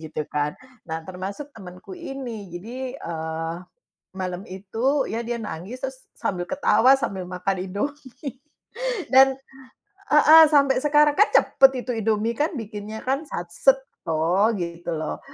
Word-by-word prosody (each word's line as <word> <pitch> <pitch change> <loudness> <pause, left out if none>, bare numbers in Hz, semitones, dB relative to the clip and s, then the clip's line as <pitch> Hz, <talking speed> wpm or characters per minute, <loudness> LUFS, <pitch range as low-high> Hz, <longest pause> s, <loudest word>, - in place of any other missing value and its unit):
gitu 155 -1 -5
kan. 150 0 -1 0.3
Nah 160 0 -4
termasuk 195 - -7
temanku 185 - -11
ini, 265 - -7
jadi, 250 +8 -6
eee, 165 - -4 0.6
malam 185 0 -4
itu 225 +9 -1
ya 225 - -1
dia 240 0 -2
nangis 220 +4 -7
terus 265 0 -4 0.2
sambil 180 -6 -2
ketawa 265 -2 +4
sambil 190 -8 -3
makan 180 +1 -2
Indomie 260 +4 -5 0.7
dan 265 0 +7 0.8
heeh, 310 +2 +9
sampai 280 -3 +4
sekarang 295 0 +5
kan 420 - +6
cepet 270 -1 +5
itu 250 - -5
Indomie 220 +1 +1
kan, 300 +4 +1
bikinnya 215 -1 -6
kan, 275 +4 -1
sat 175 -8 -5
set 270 +9 +4 0.3
toh 170 +7 +2
gitu 170 -2 -6
loh, 155 0 -4
220 Hz, 135 wpm, -24 LUFS, 180-270 Hz, 0.8 s, heeh